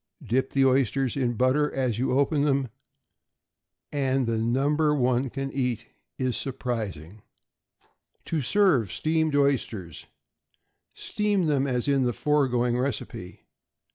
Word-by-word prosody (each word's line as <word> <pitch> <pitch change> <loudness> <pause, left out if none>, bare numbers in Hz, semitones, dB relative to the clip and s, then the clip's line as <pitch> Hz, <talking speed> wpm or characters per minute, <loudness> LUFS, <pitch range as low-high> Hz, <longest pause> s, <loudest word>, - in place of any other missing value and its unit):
Dip 130 +4 0
the 135 -1 +3
oysters 130 -1 +1
in 135 -3 0
the 120 - -2
butter 130 +5 +2
as 125 -4 -1
you 130 - 0
open 140 +1 +2
them, 140 -3 +1 1.2
and 135 -2 0
the 115 -1 -1
number 145 +6 +1
one 125 -1 +1
can 135 +2 -4
eat 125 -4 -2 0.3
is 130 -2 -1
surprising. 110 - -4 1.0
=To 160 -2 -1
serve 140 - +2
Steamed 160 -1 0
Oysters.= 120 - -1 0.9
Steam 205 -3 -1
them 140 -3 +1
as 125 -1 -1
in 140 -1 +2
the 125 -1 +1
foregoing 125 -5 +1
recipe. 130 -3 -5
130 Hz, 125 wpm, -26 LUFS, 120-145 Hz, 1.2 s, the